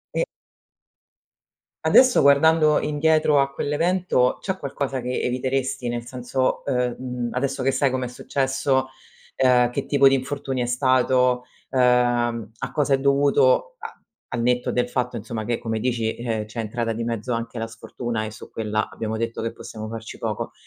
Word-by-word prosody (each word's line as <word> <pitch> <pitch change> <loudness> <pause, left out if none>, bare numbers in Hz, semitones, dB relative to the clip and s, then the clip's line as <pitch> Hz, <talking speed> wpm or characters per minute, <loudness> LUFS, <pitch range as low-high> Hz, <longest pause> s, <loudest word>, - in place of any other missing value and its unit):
E - - +2 1.6
Adesso, 255 -1 +6
guardando 155 +2 +5
indietro 150 -1 +2
a 140 0 0
quell'evento 150 -2 +1
c'è 190 -1 -3
qualcosa 135 -3 -3
che 125 +1 -2
eviteresti? 130 0 -1
Nel 120 0 -4
senso: 125 +1 -2
uhm, 125 -3 0
mhmm, 125 -2 -4
adesso 135 +1 -1
che 135 - +2
sai 140 -1 +1
com'è 130 -1 -2
successo, 130 +1 0 0.6
uhm, 125 -1 +5
che 125 - -3
tipo 140 -1 +4
di 135 - +5
infortunio 135 -1 -3
è - - -1
stato, 125 0 +2 0.3
uhm, 120 -3 +2
a - - -5
cosa 145 -2 +1
è 135 - +3
dovuto 145 - +3
a - - -9 0.4
al 120 - -1
netto 125 +1 +1
del 125 0 0
fatto, 125 -1 -2
insomma, 110 0 -5
che 120 +1 -1
come 115 -2 -3
dici, 115 -2 -1
uhm, 115 -3 -2
c'è 110 +3 -13
entrata 115 +1 -2
di 115 +1 -4
mezzo 115 +1 -3
anche 115 +1 -4
la 115 - -3
sfortuna 115 0 -5
e 110 - -6
su 110 - -12
quella 110 -1 -2
abbiamo 110 0 -4
detto 115 0 -3
che 115 - -2
possiamo 110 -1 -8
farci 115 0 -7
poco; - - -3
125 Hz, 165 wpm, -23 LUFS, 115-140 Hz, 1.6 s, Adesso